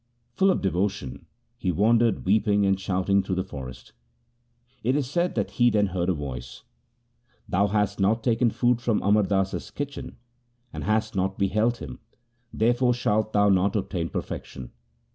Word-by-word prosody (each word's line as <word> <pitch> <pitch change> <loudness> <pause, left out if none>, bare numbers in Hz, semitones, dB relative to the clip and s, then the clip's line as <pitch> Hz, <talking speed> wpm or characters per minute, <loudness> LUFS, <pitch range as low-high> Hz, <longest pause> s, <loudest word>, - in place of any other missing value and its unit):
Full 195 +10 +3
of 185 - +1
devotion 95 -8 -2 0.3
he 90 - 0
wandered 115 +5 +2
weeping 105 +1 +3
and 95 -1 +2
shouting 95 +1 +1
through 95 - -3
the 95 - -1
forest. 65 -8 -9 0.9
It 125 +4 +1
is 145 -3 0
said 175 +6 -1
that - - -1
he 120 0 +3
then 105 -2 +2
heard 90 -2 -2
a - - +3
voice: 65 -5 -7 0.4
' - - -41
Thou 100 +3 +2
hast 105 0 0
not 110 +4 +2
taken 120 -1 +2
food 120 +1 +1
from 115 -3 0
Amar 105 +2 +4
Das's 95 -1 -1
kitchen, 145 -1 -6 0.6
and - - -5
hast 110 0 0
not 95 0 -1
beheld 110 +5 +1
him; 65 - -8 0.5
there 115 +3 +2
fore 125 0 +2
shalt 110 -2 0
thou 105 0 +4
not 95 +1 +2
obtain 90 -5 -2
perfection. 65 -2 -6
100 Hz, 165 wpm, -25 LUFS, 95-115 Hz, 0.9 s, Amar